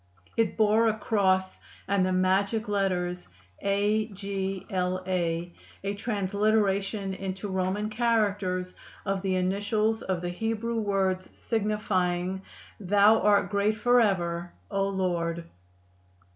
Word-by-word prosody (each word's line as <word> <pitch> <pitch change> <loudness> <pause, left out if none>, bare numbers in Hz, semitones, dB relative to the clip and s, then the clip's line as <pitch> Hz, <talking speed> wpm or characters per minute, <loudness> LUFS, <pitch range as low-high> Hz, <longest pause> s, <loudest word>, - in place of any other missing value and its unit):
It 225 -4 +1
bore 220 +1 +4
a 220 -1 +1
cross 190 -3 +1 0.3
and 200 -1 +2
the 185 - +1
magic 195 +4 +1
letters 180 -3 -1 0.3
A. 205 +2 +1
G. 195 -2 -4
L. 185 0 -1
A., 175 -2 -1 0.3
a 200 0 -1
transliteration 200 -1 0
into 195 +1 -5
Roman 190 +2 -1
characters 205 -5 0 0.3
of 195 -1 -1
the 190 -1 0
initials 205 +4 0
of 180 -2 -2
the 175 - -1
Hebrew 225 +4 -2
words 190 -3 0
signifying 190 -4 -1 0.4
"Thou 205 +3 +5
are 205 -1 +4
great 200 +2 0
forever, 190 -8 +2 0.2
O 195 -1 +1
Lord." 170 -3 -1
195 Hz, 115 wpm, -27 LUFS, 185-210 Hz, 0.4 s, Thou